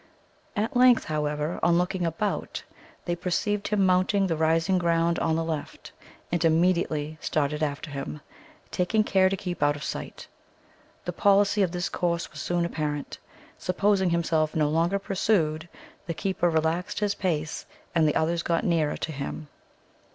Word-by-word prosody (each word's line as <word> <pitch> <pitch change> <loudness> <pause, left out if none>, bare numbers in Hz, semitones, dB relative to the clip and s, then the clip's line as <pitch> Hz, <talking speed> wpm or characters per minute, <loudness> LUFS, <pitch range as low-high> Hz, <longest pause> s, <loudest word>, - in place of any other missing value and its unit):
At 220 +4 -1
length, 250 -1 +6
however, 150 +1 -2
on 170 0 +4
looking 180 0 0
about, 200 +6 -3 0.4
they 175 - -1
perceived 195 +4 -1
him 205 -2 +2
mounting 185 +2 +3
the 170 -3 0
rising 165 +4 +2
ground 170 0 +1
on 160 - +1
the 165 - 0
left, 160 -2 -5 0.4
and 175 0 0
immediately 160 -2 +1
started 150 0 -1
after 150 0 -2
him, 140 +2 -5 0.5
taking 215 +4 +1
care 190 -2 +3
to 195 - -2
keep 180 -3 -5
out 145 0 +3
of 145 - -8
sight. - - -6 0.8
The - - -3
policy 200 0 +3
of 185 -3 +2
this 175 0 -2
course 170 -1 -2
was - - -10
soon 175 -1 0
apparent. 150 -3 -3 0.4
Supposing 190 +1 +2
himself 160 -2 +1
no 150 -2 +2
longer 165 +5 +1
pursued, 175 -5 0 0.4
the 170 - -3
keeper 185 -1 0
relaxed 160 +3 0
his 205 -1 +1
pace, 160 -6 -2 0.3
and 160 -2 +3
the 150 - +1
others 170 +1 +1
got 170 +2 0
nearer 165 -6 +1
to 160 - -4
him. 145 +1 -6
170 Hz, 160 wpm, -26 LUFS, 155-190 Hz, 0.8 s, length